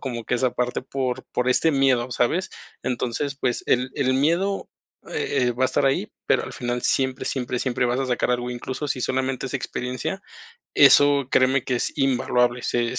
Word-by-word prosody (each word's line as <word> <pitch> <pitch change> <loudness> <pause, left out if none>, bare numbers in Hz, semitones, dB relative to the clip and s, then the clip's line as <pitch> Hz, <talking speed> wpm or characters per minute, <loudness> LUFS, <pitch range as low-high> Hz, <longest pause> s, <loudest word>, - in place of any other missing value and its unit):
como 120 -4 -5
que 125 - -1
esa 130 0 +1
parte 125 0 -2
por 130 -1 -3
por 125 0 0
este 160 +5 +3
miedo, 130 -3 +2
¿sabes? 170 +12 0 0.3
Entonces, 130 +3 -2
pues, 125 -2 0
el 125 +1 +1
el 130 -3 +1
miedo, 170 +8 +1 0.4
eh, 125 -3 0
va 125 +2 0
a - - +5
estar 140 - +1
ahí, 135 -6 0 0.2
pero, - - +2
al - - -8
final 120 0 -2
siempre, 130 -1 0
siempre, 125 -2 -2
siempre 125 -1 0
vas 125 +2 0
a 135 - -1
sacar 125 0 0
algo, 125 0 -1
incluso 130 +4 -5
si 130 - -2
solamente 130 +1 -1
es 130 - -7
experiencia, 130 +7 -4 0.5
eso 145 -2 +6
créeme 130 0 +3
que 125 - 0
es - - -2
invaluable. 125 -2 +2
Se 120 +1 -1
se - - 0
130 Hz, 190 wpm, -23 LUFS, 125-135 Hz, 0.5 s, eso